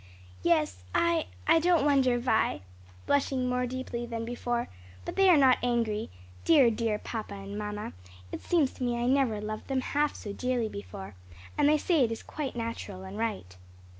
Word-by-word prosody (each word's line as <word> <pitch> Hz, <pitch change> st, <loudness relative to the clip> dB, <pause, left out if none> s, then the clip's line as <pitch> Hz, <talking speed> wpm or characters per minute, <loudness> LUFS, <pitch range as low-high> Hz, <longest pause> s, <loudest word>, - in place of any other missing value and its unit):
"Yes, 150 Hz, -, +1 dB
I 340 Hz, -2 st, +2 dB, 0.2 s
I 325 Hz, +1 st, +5 dB
don't 335 Hz, -3 st, +3 dB
wonder, 265 Hz, -4 st, +3 dB
Vi," 235 Hz, -, +1 dB, 0.4 s
blushing 270 Hz, -2 st, +1 dB
more 250 Hz, 0 st, 0 dB
deeply 245 Hz, -1 st, -4 dB
than 230 Hz, -1 st, -4 dB
before, 240 Hz, 0 st, -2 dB, 0.4 s
"but -, -, -5 dB
they 390 Hz, -1 st, +5 dB
are 345 Hz, -, +7 dB
not 265 Hz, -3 st, +5 dB
angry 230 Hz, -3 st, 0 dB, 0.3 s
dear, 280 Hz, -8 st, +6 dB
dear 220 Hz, -1 st, -1 dB
mamma 200 Hz, -3 st, -5 dB
and 200 Hz, +1 st, -6 dB
papa 210 Hz, 0 st, -5 dB, 0.4 s
it -, -, -5 dB
seems 315 Hz, -7 st, +2 dB
to -, -, -7 dB
me 240 Hz, -1 st, 0 dB
I 240 Hz, -, -1 dB
never 255 Hz, -4 st, +2 dB
loved 215 Hz, +1 st, -5 dB
them 265 Hz, -1 st, 0 dB
half 295 Hz, +3 st, 0 dB
so 205 Hz, -, -6 dB
dearly 250 Hz, -1 st, -1 dB
before 95 Hz, -, -8 dB, 0.4 s
and 290 Hz, -, +4 dB
they 305 Hz, -, +5 dB
say 315 Hz, -2 st, +2 dB
it 230 Hz, -, +1 dB
is 225 Hz, -, -5 dB
quite 290 Hz, -5 st, -5 dB
natural 230 Hz, -5 st, -5 dB
and 190 Hz, +1 st, -8 dB
right." 210 Hz, -, -3 dB
240 Hz, 180 wpm, -29 LUFS, 215-275 Hz, 0.4 s, are